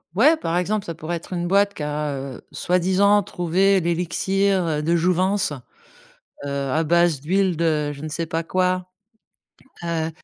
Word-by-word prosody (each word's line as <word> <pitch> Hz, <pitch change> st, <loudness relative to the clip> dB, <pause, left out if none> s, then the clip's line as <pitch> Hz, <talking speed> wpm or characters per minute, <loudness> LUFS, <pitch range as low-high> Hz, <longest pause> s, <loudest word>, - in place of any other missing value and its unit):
Ouais, 300 Hz, -, +5 dB
par 170 Hz, -, -2 dB
exemple, 200 Hz, +3 st, -1 dB
ça 165 Hz, -, -4 dB
pourrait 165 Hz, +1 st, -4 dB
être 170 Hz, +2 st, -8 dB
une 175 Hz, -1 st, -2 dB
boîte 200 Hz, +2 st, +3 dB
qui -, -, -9 dB
a, 150 Hz, 0 st, -2 dB
heu, 135 Hz, -1 st, -7 dB
soi-disant 190 Hz, +3 st, +2 dB
trouvé 190 Hz, +4 st, +2 dB
l'élixir, 185 Hz, +3 st, 0 dB
heu, 150 Hz, -1 st, -1 dB
de 170 Hz, +2 st, +2 dB
jouvence, 185 Hz, 0 st, +1 dB, 0.9 s
heu, -, -, -4 dB, 0.2 s
à 160 Hz, +4 st, +1 dB
base 170 Hz, -3 st, +3 dB
d'huile 185 Hz, +2 st, +1 dB
de 155 Hz, -3 st, 0 dB
je 140 Hz, +1 st, -10 dB
ne 155 Hz, -, -4 dB
sais 165 Hz, +2 st, -3 dB
pas 165 Hz, +1 st, -2 dB
quoi, 185 Hz, 0 st, 0 dB, 1.0 s
heu, 165 Hz, -1 st, -2 dB
175 Hz, 165 wpm, -22 LUFS, 160-190 Hz, 1.0 s, Ouais